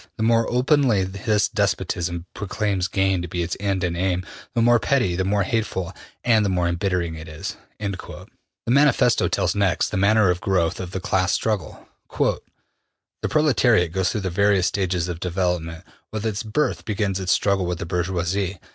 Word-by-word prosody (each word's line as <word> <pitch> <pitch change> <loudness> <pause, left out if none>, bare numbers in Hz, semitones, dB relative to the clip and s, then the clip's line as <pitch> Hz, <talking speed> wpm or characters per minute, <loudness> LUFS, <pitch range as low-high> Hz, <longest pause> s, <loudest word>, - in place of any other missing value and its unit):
The 110 - -1
more 115 0 +3
openly 125 -4 +3
this 100 +2 0
despotism 90 -3 -1
proclaims 100 -2 -1
gain 95 -1 +1
to 90 - -5
be 85 +1 -2
its 85 0 -3
end 95 -2 -1
and 85 -1 -1
aim, 90 0 -1 0.3
the 115 - +2
more 120 0 +5
petty, 115 -8 +1
the 95 - 0
more 100 +1 +1
hateful, 95 -4 -2 0.3
and 115 -3 +4
the 100 - +1
more 90 -2 +1
embittering 85 -1 -1
it 80 0 -9
is.'' 75 0 -6 0.2
The 100 -3 -6 0.4
Manifesto 125 -1 +4
tells 95 -3 0
next 100 -3 +1
the 105 - -3
manner 100 0 +4
of 90 - -3
growth 90 -4 0
of 90 - -5
the 95 - -4
class 95 0 +1
struggle. 105 -6 -2 0.2
``The - - 0 0.9
proletariat 125 - +3
goes 95 0 0
through 110 - -2
various 95 0 +2
stages 90 -3 0
of 85 -2 -5
development. 90 -2 -2 0.3
With 110 0 -4
its 105 -2 -1
birth 115 +7 -1
begins 100 -3 -1
its 95 -2 -1
struggle 100 -3 +2
with 90 -1 -2
the 85 - -5
bourgeoisie. 90 +2 -1
95 Hz, 175 wpm, -23 LUFS, 90-105 Hz, 0.9 s, more